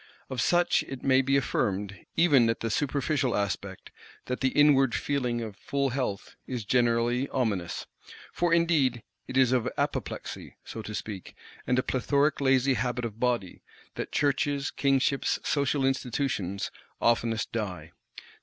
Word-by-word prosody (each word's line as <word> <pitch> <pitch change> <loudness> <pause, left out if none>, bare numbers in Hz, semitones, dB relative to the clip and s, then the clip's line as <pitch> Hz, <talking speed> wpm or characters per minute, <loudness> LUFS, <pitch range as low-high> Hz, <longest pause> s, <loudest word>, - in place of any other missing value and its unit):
Of 125 -2 -1
such 175 +5 +3
it 135 -2 -7
may 130 -1 +4
be 135 +1 +2
affirmed 100 -6 -2
even 145 -9 +5
that 115 - -1
the 115 - -1
superficial 140 0 0
aspect, 100 -3 -3 0.3
that 125 - -3
the 130 - +2
inward 135 -3 +4
feeling 125 -4 -1
of 110 -3 -6
full 140 - -1
health, 125 -6 -3
is 125 -5 -4
generally 120 +2 +2
ominous. 105 -10 -2 0.5
For 175 -1 +1
indeed 155 -8 +2 0.2
it 130 - -3
is 130 -2 +5
of 125 -3 +1
apoplexy, - - -3
so 110 - -6
to 105 0 -6
speak, 100 -4 -6 0.3
and 125 - +2
a 130 - +2
plethoric 140 +4 +1
lazy 135 0 +3
habit 125 +1 -1
of 110 -1 -6
body, 120 -7 -1 0.3
that - - -5
Churches, 140 -1 0
Kingships, 135 0 +1
Social 140 -1 +1
Institutions, 125 -7 -1 0.3
oftenest 115 -1 +1
die. 90 -8 -4
125 Hz, 145 wpm, -28 LUFS, 115-140 Hz, 0.5 s, even